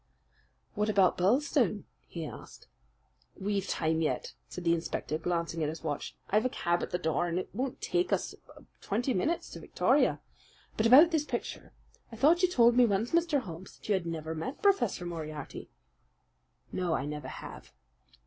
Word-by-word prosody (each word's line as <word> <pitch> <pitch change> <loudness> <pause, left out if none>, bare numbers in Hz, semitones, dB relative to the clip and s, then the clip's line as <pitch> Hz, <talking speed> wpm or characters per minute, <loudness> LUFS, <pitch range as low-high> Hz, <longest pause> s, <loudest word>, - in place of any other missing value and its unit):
"What 210 +1 0
about 195 -3 +4
Birlstone?" 235 +2 +2 0.2
he 165 -2 -6
asked. - - -11 0.7
"We've 200 0 -1
time 160 0 0
yet," 155 - -1 0.2
said 180 - -7
the 170 -1 +3
inspector, 160 -2 -2
glancing 170 -1 -2
at 150 - +1
his 160 +2 -7
watch. 150 -3 -4 0.2
"I've 215 +2 +4
a 255 - +1
cab 175 -6 0
at - - -3
the - - -1
door, 165 +1 0
and 170 0 -2
it 185 - -3
won't 255 +4 -3
take 360 0 0
us - - 0 0.5
twenty 245 +6 -1
minutes 320 - -1
to - - -8
Victoria. - - +2 0.6
But 220 - +2
about 295 +8 +8
this 310 -2 +1
picture: - - -5 0.4
I - - -8
thought 305 +9 +4
you 365 - +4
told 240 -7 +5
me 250 0 +6
once, 210 +3 0
Mr. 335 -4 +2
Holmes, 180 -3 -10
that - - -13
you - - +4
had 185 -3 -1
never 160 -1 -4
met 255 - -5
Professor 245 - +2
Moriarty." 155 -3 -6 1.0
"No, 175 -3 0
I 135 - -2
never 150 -2 -5
have." - - -9
190 Hz, 175 wpm, -30 LUFS, 165-250 Hz, 1.0 s, about